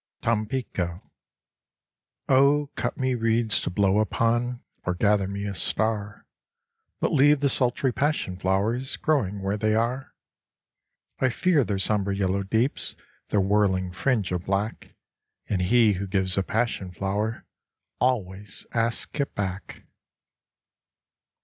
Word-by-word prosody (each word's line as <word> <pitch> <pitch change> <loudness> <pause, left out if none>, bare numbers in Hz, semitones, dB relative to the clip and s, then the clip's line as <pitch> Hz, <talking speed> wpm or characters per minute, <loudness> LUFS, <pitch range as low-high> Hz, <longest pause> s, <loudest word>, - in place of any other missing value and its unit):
Tampico 105 -6 -2 1.2
Oh, 140 +2 +4
cut - - -3
me 130 -1 0
reeds 115 -1 +2
to - - -2
blow 100 +2 +2
upon 120 +3 0 0.2
Or 90 - -1
gather 100 +1 +2
me 100 +1 -4
a 100 - -3
star, 105 +2 -1 0.7
But - - 0
leave 145 +2 +5
the 140 - +3
sultry 125 0 +1
passion 145 -10 0
flowers 100 +8 0
Growing 105 -11 0
where 100 +2 0
they 110 +1 +2
are. 120 +4 -1 1.0
I 130 - +3
fear 160 +3 +2
their 105 -3 -2
somber 100 0 +1
yellow 100 0 0
deeps, 110 +7 -1 0.3
Their 105 - +2
whirling 95 -2 +2
fringe 100 +1 0
of 90 -1 -2
black, 100 +3 -2 0.5
And 95 -3 0
he 110 +3 +4
who 100 +1 -4
gives 95 -1 0
a 95 - +2
passion 110 -2 -1
flower 100 +5 -3 0.5
Always 100 -6 -1
asks 115 +5 -1
it 140 - -4
back. 95 -1 -5
105 Hz, 125 wpm, -25 LUFS, 95-120 Hz, 1.2 s, leave